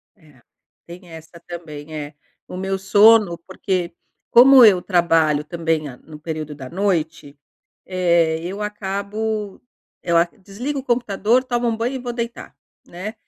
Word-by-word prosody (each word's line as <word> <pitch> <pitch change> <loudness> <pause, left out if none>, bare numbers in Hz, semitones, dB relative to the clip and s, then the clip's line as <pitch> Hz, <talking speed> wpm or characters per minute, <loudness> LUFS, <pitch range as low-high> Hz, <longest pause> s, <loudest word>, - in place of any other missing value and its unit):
É. 150 - -23 0.5
Tem 175 +1 -12
essa 160 +1 -12
também, 155 -3 -9
é. 150 0 -6 0.3
O - - -9
meu 190 +1 -2
sono 205 -2 +5
porque, 185 -2 -3 0.4
como 260 +2 +8
eu 195 -5 +6
trabalho 165 -5 +2
também 160 -2 -2
a 125 - -11
no 155 -1 -14
período 155 -2 -6
da 130 -3 -9
noite, 165 -6 -2 0.5
eh, 170 -3 +1
eu 195 +4 -5
acabo, 210 +1 -4 0.4
ela 170 0 +3 0.2
desligo 250 +9 -5
o - - -15
computador, 240 0 +1
tomo 240 -2 -1
um 225 - -1
banho 235 +4 -2
e - - -4
vou 245 -1 -5
deitar, 235 0 -6 0.3
né. 190 +6 -7
185 Hz, 145 wpm, -20 LUFS, 160-215 Hz, 0.5 s, como